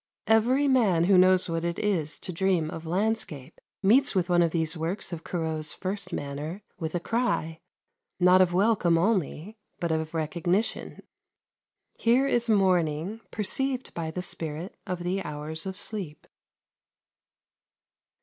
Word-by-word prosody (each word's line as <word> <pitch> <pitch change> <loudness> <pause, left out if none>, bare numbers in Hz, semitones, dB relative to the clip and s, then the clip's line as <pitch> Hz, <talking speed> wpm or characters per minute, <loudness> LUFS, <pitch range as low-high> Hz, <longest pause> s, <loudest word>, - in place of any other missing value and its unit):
Every 245 +6 +3
man 215 -11 +3
who 190 +2 +4
knows 185 0 +5
what 165 -1 -2
it 170 0 -2
is 175 -8 0
to 180 - -6
dream 170 -3 0
of 165 0 -7
landscape 180 -7 -2 0.2
meets 240 +5 +4
with 180 -1 +1
one 175 -1 +4
of 170 - +3
these 160 0 +1
works 170 +4 -3
of 160 -1 -6
Corot's 160 -3 -2
first 190 0 -4
manner 150 +7 -5 0.2
with 160 -1 -4
a - - +1
cry, 170 -7 -1 0.6
not 180 +1 +6
of 180 -1 +3
welcome 185 -3 +3
only, 195 +1 -1 0.2
but 170 -1 -1
of 160 0 -2
recognition. 175 +6 -2 0.9
Here 245 +4 +2
is 240 -3 +2
morning 185 -1 +1
perceived 260 +5 -1
by 165 -1 -4
the 180 +3 -5
spirit 165 +2 -3
of 180 -1 -4
the 185 +2 -1
hours 155 +2 -4
of 190 0 -5
sleep. 195 -8 -4
180 Hz, 140 wpm, -27 LUFS, 160-205 Hz, 0.9 s, not